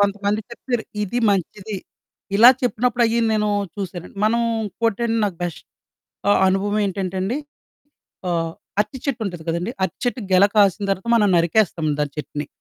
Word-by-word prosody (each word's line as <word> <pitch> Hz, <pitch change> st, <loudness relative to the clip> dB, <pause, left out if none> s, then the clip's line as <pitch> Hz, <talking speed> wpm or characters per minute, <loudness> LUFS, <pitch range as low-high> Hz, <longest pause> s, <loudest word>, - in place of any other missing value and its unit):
కొంతమంది 205 Hz, +1 st, +1 dB
చెప్తారు, 235 Hz, -1 st, -3 dB, 0.2 s
ఇది 210 Hz, +4 st, -2 dB
మంచిది, 200 Hz, +2 st, -2 dB, 0.6 s
ఇలా 235 Hz, +4 st, +10 dB
చెప్పినప్పుడయ్యి 240 Hz, -1 st, +1 dB
నేనూ 210 Hz, -1 st, +1 dB, 0.3 s
చూసానండి. 185 Hz, -2 st, -6 dB
మనం 235 Hz, +2 st, +2 dB, 0.2 s
ఇంకోటండి, 230 Hz, +2 st, -1 dB
నాకు 195 Hz, -4 st, -2 dB
బెష్ 175 Hz, -3 st, -3 dB, 0.7 s
ఆహ్, -, -, +4 dB
అనుభవమేంటంటే 195 Hz, -1 st, 0 dB
అండి, 210 Hz, +7 st, -1 dB, 0.9 s
ఆహ్, 165 Hz, -1 st, -1 dB, 0.3 s
అరటి 210 Hz, +5 st, -2 dB
చెట్టుంటంది 210 Hz, -, -3 dB
కదండి, 170 Hz, +6 st, -1 dB
అరటి 190 Hz, -3 st, -1 dB
చెట్టుకు 240 Hz, -5 st, -2 dB
గెల 190 Hz, +2 st, +7 dB
కాసిన 205 Hz, -1 st, +4 dB
తర్వాత, 195 Hz, +3 st, -2 dB
మనం 210 Hz, -3 st, +4 dB
నరికేస్తాం 170 Hz, -1 st, +1 dB
దాని 145 Hz, -1 st, -2 dB
చెట్టుని. 150 Hz, -1 st, -5 dB
205 Hz, 135 wpm, -21 LUFS, 185-225 Hz, 0.9 s, ఇలా